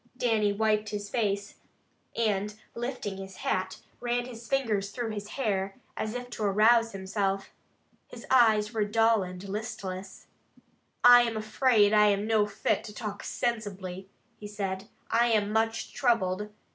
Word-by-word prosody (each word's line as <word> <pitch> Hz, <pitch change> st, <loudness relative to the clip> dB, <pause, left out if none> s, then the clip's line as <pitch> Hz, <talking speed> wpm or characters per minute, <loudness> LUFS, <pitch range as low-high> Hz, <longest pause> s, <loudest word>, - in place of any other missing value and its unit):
Dannie 220 Hz, -5 st, +2 dB
wiped 215 Hz, 0 st, +1 dB
his 205 Hz, -1 st, -5 dB
face, 200 Hz, -3 st, -1 dB, 0.6 s
and 210 Hz, -2 st, 0 dB, 0.2 s
lifting 235 Hz, -5 st, -4 dB
his 195 Hz, -1 st, -8 dB
hat, 185 Hz, 0 st, -1 dB, 0.2 s
ran 240 Hz, 0 st, -1 dB
his 235 Hz, -2 st, -10 dB
fingers 220 Hz, -8 st, 0 dB
through 235 Hz, 0 st, -4 dB
his 205 Hz, -1 st, -5 dB
hair, 195 Hz, -6 st, -1 dB, 0.2 s
as 220 Hz, +2 st, -3 dB
if 245 Hz, 0 st, -6 dB
to 220 Hz, -, -4 dB
arouse 225 Hz, +3 st, +4 dB
himself. 195 Hz, 0 st, -2 dB, 0.6 s
His -, -, -11 dB
eyes 220 Hz, -4 st, +4 dB
were 220 Hz, -2 st, +1 dB
dull 225 Hz, +1 st, +3 dB
and 185 Hz, +1 st, -7 dB
listless. 195 Hz, -2 st, -6 dB, 0.8 s
"I 245 Hz, 0 st, +9 dB
am 230 Hz, -2 st, -1 dB
afraid 215 Hz, -1 st, +3 dB
I 210 Hz, 0 st, +6 dB
am 200 Hz, 0 st, +1 dB
no 215 Hz, -2 st, +2 dB
fit 205 Hz, -, -1 dB
to 210 Hz, -, -8 dB
talk 205 Hz, -2 st, -5 dB
sensibly," 195 Hz, -5 st, -3 dB, 0.3 s
he 210 Hz, -, -8 dB
said. 195 Hz, -1 st, -4 dB, 0.2 s
"I 235 Hz, +1 st, +4 dB
am 210 Hz, -3 st, +2 dB
much 225 Hz, +1 st, 0 dB
troubled. 210 Hz, -5 st, +1 dB
210 Hz, 145 wpm, -28 LUFS, 200-230 Hz, 0.8 s, I